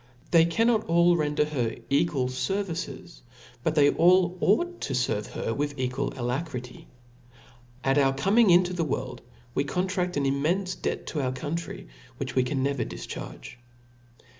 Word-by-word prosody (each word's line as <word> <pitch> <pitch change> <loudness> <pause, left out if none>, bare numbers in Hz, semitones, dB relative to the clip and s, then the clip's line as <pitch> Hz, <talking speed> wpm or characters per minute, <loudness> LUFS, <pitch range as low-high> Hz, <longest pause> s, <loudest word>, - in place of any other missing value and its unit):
They 165 -1 +6
cannot 225 +6 +2
all 170 +1 +4
render 150 -2 +1
her 125 -7 -2 0.2
equal 140 -2 +2
fervices, 170 - -4 0.4
but 160 - 0
they 145 -2 +5
all 180 +1 +4
ought 350 - +1
to 135 - -3
ferve 115 -4 0
her 115 - -3
with 145 +1 -2
equal 130 +2 -2
alacrity* 125 0 -4 1.0
At 135 +2 +3
our 135 -1 +4
coming 195 +11 +3
into 180 +1 +5
the 175 -2 -1
world, 150 - -3 0.3
we 140 - +1
contraft 180 +2 -1
an 145 - +1
immenfe 165 +8 0
debt - - -2
ta 155 - -4
our 130 -2 0
country, 160 +5 -5 0.3
which 130 -1 -4
we 130 - +3
can 130 +1 -1
never 140 -2 0
difcharg^. - - -8
150 Hz, 150 wpm, -27 LUFS, 135-180 Hz, 1.0 s, They